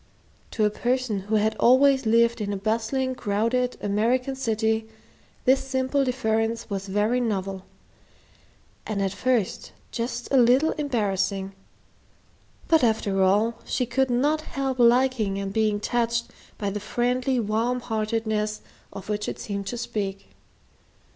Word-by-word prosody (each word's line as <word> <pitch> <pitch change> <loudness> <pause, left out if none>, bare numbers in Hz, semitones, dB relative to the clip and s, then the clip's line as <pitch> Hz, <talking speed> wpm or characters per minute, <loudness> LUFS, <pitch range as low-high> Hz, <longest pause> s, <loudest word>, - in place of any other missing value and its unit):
To 215 - 0
a 210 - +2
person 245 -2 -1
who 205 +3 -2
had 215 +1 +2
always 265 0 +4
lived 230 +1 +3
in 205 -1 -2
a 200 - -2
bustling, 230 +6 -1
crowded 240 +3 0
American 240 +6 0
city 220 -3 0 0.6
this 265 +1 +4
simple 265 +1 0
deference 230 -3 -1
was 195 0 -3
very 210 +5 +1
novel, 195 -4 -2 1.2
and 215 -2 -2
at 195 -1 0
first 235 0 -1 0.2
just 240 0 -3
a 275 - +4
little 255 +5 +5
embarrassing; 200 -8 -1 1.1
but 320 -4 +4
after 210 -4 +1
all, 210 +5 +2
she 250 - -1
could 260 +2 0
not 290 +6 +1
help 270 -4 -3
liking 240 -4 +3
and 195 0 -4
being 215 -1 +1
touched 235 +1 -1 0.3
by 200 -2 -2
the 210 - -3
friendly 250 +4 0
warm 230 +3 0
heartedness 215 -2 -2 0.3
of 195 - -9
which 210 0 -2
it - - -5
seemed 200 -1 -5
to 240 - -3
speak. 200 -4 -4
225 Hz, 135 wpm, -25 LUFS, 205-250 Hz, 1.2 s, little